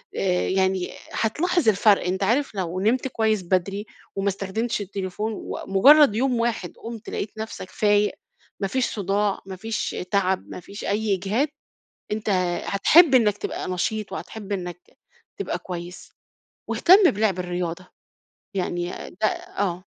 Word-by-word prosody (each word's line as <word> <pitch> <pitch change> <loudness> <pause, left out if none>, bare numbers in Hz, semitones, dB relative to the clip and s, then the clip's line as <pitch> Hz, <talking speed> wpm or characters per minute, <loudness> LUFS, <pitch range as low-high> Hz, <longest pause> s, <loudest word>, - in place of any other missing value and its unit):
آآ 180 -2 +1
يعني 190 -1 +1 0.2
هتلاحظ 305 +5 +1
الفرق 205 -2 +4
أنت 190 +2 -1
عارف 240 +3 +1
لو 185 -1 -2
نمت 240 +6 +1
كويس 220 -5 0
بدري، 195 +3 0 0.3
وما 195 0 -1
استخدمتش 205 +4 -2
التليفون، 200 +2 -3
ومجرَّد 275 +6 +5
يوم 250 +1 +1
واحد 230 -6 -1
قُمت 230 -1 -8
لقيت 205 - -3
نفسك 220 -4 -6
فايق، 205 -1 +2 0.5
ما 195 - 0
فيش 260 +4 -1
صُداع، 205 0 0
ما 190 -1 -7
فيش 220 +4 -3 0.2
تعب، 190 -2 +1
ما - - -7
فيش 200 +4 -10
أي 205 0 +1
إجهاد، 205 +10 0 0.6
أنت 215 0 -2 0.4
هتحب 280 - +6
إنَّك 210 -5 +4
تبقى - - -4
نشيط 195 +3 -2
وهتحب 210 +1 -7
إنَّك 180 -3 -3
ت - - -25 0.5
تبقى - - -3
كويس، 175 0 -8 0.6
واهتم 370 +1 +6
بلعب 205 -2 0
الرياضة، 180 0 -3 0.7
يعني 175 -2 -2 0.2
ده 215 +3 -1 0.3
آه. 185 -2 -1
200 Hz, 140 wpm, -24 LUFS, 185-220 Hz, 0.7 s, هتحب